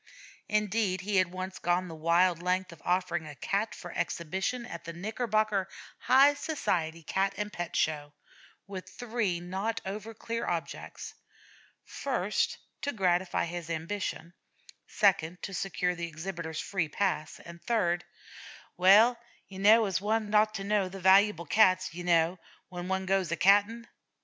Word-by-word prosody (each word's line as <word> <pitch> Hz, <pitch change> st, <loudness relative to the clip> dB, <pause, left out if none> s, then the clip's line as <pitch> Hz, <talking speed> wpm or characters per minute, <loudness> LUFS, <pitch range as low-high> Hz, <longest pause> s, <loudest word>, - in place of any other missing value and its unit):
Indeed, 210 Hz, -3 st, 0 dB
he 200 Hz, +1 st, -1 dB
had 185 Hz, -2 st, +3 dB
once 185 Hz, +1 st, -6 dB
gone 175 Hz, +1 st, 0 dB
the 165 Hz, -, -8 dB
wild 170 Hz, +2 st, +2 dB
length 185 Hz, +1 st, 0 dB
of 170 Hz, -, -14 dB
offering 180 Hz, -3 st, 0 dB
a 150 Hz, -, -9 dB
Cat 200 Hz, +8 st, -2 dB
for 175 Hz, -, -9 dB
exhibition 190 Hz, +12 st, -2 dB
at 170 Hz, -8 st, -8 dB
the 170 Hz, -, -7 dB
Knickerbocker 215 Hz, +1 st, -1 dB, 0.3 s
High 275 Hz, +3 st, +6 dB
Society 165 Hz, -, -2 dB
Cat 195 Hz, +5 st, 0 dB
and 210 Hz, 0 st, -4 dB
Pet 175 Hz, 0 st, -5 dB
Show, 150 Hz, -2 st, 0 dB, 0.5 s
with 190 Hz, -2 st, -8 dB
three 225 Hz, -7 st, -2 dB
not 190 Hz, +6 st, -3 dB
over 210 Hz, +3 st, -6 dB
clear 230 Hz, +2 st, -4 dB
objects: 170 Hz, -2 st, -5 dB, 0.7 s
first, -, -, -1 dB, 0.2 s
to 285 Hz, -, -1 dB
gratify 180 Hz, -5 st, +1 dB
his 170 Hz, -1 st, -6 dB
ambition; 170 Hz, +1 st, -4 dB, 0.5 s
second, 180 Hz, -4 st, +1 dB
to 195 Hz, -, -5 dB
secure 180 Hz, -1 st, -1 dB
the 170 Hz, -1 st, -4 dB
exhibitor's 160 Hz, 0 st, -6 dB
free 185 Hz, -6 st, -2 dB
pass; 155 Hz, -4 st, -2 dB
and, 170 Hz, 0 st, -12 dB
third, 175 Hz, -7 st, 0 dB, 0.7 s
"well, 215 Hz, +6 st, +6 dB, 0.3 s
you 190 Hz, -1 st, -10 dB
kneow, 215 Hz, +4 st, +7 dB, 0.2 s
one 215 Hz, 0 st, -1 dB
'as 215 Hz, +1 st, +6 dB
to 195 Hz, -2 st, -4 dB
kneow 200 Hz, -2 st, +1 dB
the 195 Hz, -, -8 dB
valuable 190 Hz, -1 st, +4 dB
Cats, 185 Hz, 0 st, +3 dB
you 175 Hz, +1 st, -6 dB
kneow, 170 Hz, 0 st, +2 dB, 0.3 s
when 180 Hz, -1 st, -6 dB
one 190 Hz, 0 st, -1 dB
goes 190 Hz, -2 st, +1 dB
a -, -, +1 dB
catting." 205 Hz, +5 st, +3 dB
185 Hz, 150 wpm, -29 LUFS, 170-210 Hz, 0.7 s, kneow